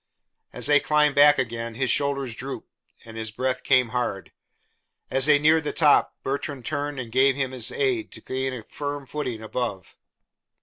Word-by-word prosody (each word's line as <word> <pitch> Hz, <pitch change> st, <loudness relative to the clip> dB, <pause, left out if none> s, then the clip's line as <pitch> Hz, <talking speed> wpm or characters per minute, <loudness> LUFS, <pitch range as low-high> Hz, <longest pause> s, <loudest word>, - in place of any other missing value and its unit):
As -, -, -1 dB
they 145 Hz, 0 st, +6 dB
climbed 150 Hz, -1 st, +2 dB
back 145 Hz, +1 st, +6 dB
again, 115 Hz, -3 st, -3 dB
his 130 Hz, -1 st, 0 dB
shoulders 140 Hz, -4 st, -1 dB
drooped 135 Hz, +4 st, -7 dB, 0.4 s
and 115 Hz, -1 st, -10 dB
his 110 Hz, 0 st, -4 dB
breath 130 Hz, +3 st, -2 dB
came 125 Hz, -2 st, +3 dB
hard. 120 Hz, -5 st, -3 dB, 0.8 s
As 135 Hz, +1 st, +5 dB
they 150 Hz, -1 st, +6 dB
neared 155 Hz, +2 st, +3 dB
the 150 Hz, -, -2 dB
top, 150 Hz, -3 st, +3 dB
Bertrand 135 Hz, -1 st, -4 dB
turned 145 Hz, -2 st, -3 dB
and 120 Hz, -3 st, -6 dB
gave 135 Hz, +2 st, +3 dB
him 135 Hz, -2 st, -2 dB
his 125 Hz, -3 st, -2 dB
aid 375 Hz, -6 st, -1 dB
to -, -, -10 dB
gain 130 Hz, 0 st, -3 dB
a 125 Hz, -3 st, -7 dB
firm 145 Hz, +3 st, -6 dB
footing 125 Hz, -6 st, -5 dB
above. 110 Hz, -5 st, -5 dB
135 Hz, 175 wpm, -24 LUFS, 120-145 Hz, 0.8 s, they